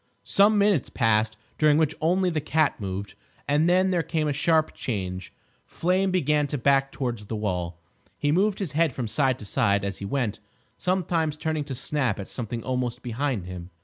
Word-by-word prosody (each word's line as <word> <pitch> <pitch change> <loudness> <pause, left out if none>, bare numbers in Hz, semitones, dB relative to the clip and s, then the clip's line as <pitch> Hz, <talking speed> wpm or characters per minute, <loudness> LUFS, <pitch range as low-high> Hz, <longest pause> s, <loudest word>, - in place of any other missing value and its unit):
Some 205 +2 +4
minutes 200 -8 +3
passed, 110 -2 +1 0.2
during 150 -1 +5
which 160 -1 +2
only 180 +3 +2
the 155 -2 -1
cat 155 +1 +1
moved, 100 +1 -4 0.3
and 150 +4 +3
then 185 +1 +3
there 175 -2 +2
came 160 -2 -1
a 145 - +1
sharp 155 +2 +2
change. 95 -6 -4 0.3
Flame 185 +3 0
began 150 -5 +2
to 145 - -3
back 135 +1 +2
towards 120 -6 -4
the 110 - -3
wall. 90 -5 -2 0.4
He 145 - +1
moved 195 +5 +2
his 190 -8 -3
head 160 -2 +2
from 120 -2 -3
side 130 +2 +1
to 105 - -10
side 100 -3 +1
as 100 -1 -4
he 100 - -5
went, 115 -2 -1 0.4
sometimes 170 -4 0
turning 155 -1 -2
to 135 -2 -5
snap 125 -4 -1
at 100 - -6
something 115 -1 -5
almost 125 -2 -2
behind 125 -4 -2
him. 90 -1 -8
140 Hz, 185 wpm, -26 LUFS, 110-160 Hz, 0.4 s, during